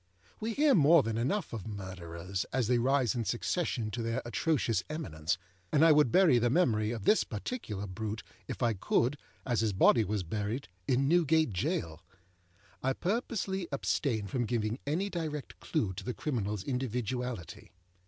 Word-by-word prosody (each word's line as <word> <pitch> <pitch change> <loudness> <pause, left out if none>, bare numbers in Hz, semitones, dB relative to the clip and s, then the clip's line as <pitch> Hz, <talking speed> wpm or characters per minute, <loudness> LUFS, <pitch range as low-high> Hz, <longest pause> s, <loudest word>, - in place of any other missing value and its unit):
We 225 +1 -2
hear 295 -1 +5
more 165 - +6
than 115 -1 -2
enough 140 - -1
of 110 -2 -5
murderers 95 -2 -5
as 130 -2 +1
they 125 0 +3
rise 130 -1 +2
in 120 -2 -1
succession 120 - -1
to 115 +3 -3
their 115 +2 -2
atrocious 120 0 0
eminence, 85 - -2 0.3
and 150 +2 +5
I 165 - +7
would 150 -5 +5
bury 165 -8 +5
the 120 +1 +2
memory 115 -9 +2
of 115 -3 -4
this 215 - +4
particular 105 - -5
brute, 105 +2 -5 0.2
if - - -4
I 115 -1 +3
could, 120 +6 +1 0.3
as 120 -4 +1
his 110 -3 +1
body 110 +4 +5
was 105 -1 -2
buried, 105 +7 -3 0.2
in 135 +2 +2
Newgate 160 - +3
Jail. 85 -2 -2 0.8
I 135 +1 +1
purposely 195 - -2
abstain 130 -5 0
from 120 +5 -1
giving 115 +1 -1
any 170 +7 0
direct 155 -4 -4
clue 110 - -1
to 95 +2 -7
the 125 +3 -4
criminalâs 105 - -2
individuality. 125 - -3
120 Hz, 165 wpm, -31 LUFS, 105-150 Hz, 0.8 s, I